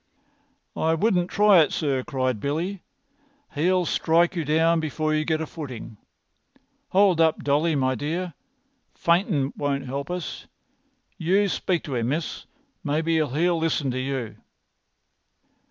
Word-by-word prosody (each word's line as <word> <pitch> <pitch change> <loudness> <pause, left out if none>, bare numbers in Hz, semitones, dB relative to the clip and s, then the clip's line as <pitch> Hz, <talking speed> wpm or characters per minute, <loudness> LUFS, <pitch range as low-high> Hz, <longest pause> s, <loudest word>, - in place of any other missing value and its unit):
"I 160 +1 +1
wouldn't 180 -1 +1
try 205 -3 +5
it, 150 - +1
sir," 140 -4 0
cried 130 -5 -1
Billy. 170 - -2 0.7
"He'll 180 +4 +2
strike 170 +3 +2
you 170 - -1
down 160 +3 +2
before 155 0 -1
you 155 0 +1
get 160 0 0
a - - -2
footing. 130 -9 -8 0.9
Hold 190 -3 +4
up, 160 -1 +2
Dolly, 150 +4 +2
my 130 -2 +1
dear! 165 +7 -3 0.6
Faintin' 170 - +1
won't 140 -2 -2
'elp 140 +4 -4
us. 180 -2 -5 0.7
You 190 +5 +2
speak 180 -2 -1
to 140 - -6
him, 120 -1 -1
miss. 155 +3 -3 0.4
Maybe 160 +2 0
he'll 160 +3 +1
listen 155 -4 0
to 130 - -3
you." 130 -3 -4
160 Hz, 135 wpm, -24 LUFS, 140-175 Hz, 0.9 s, try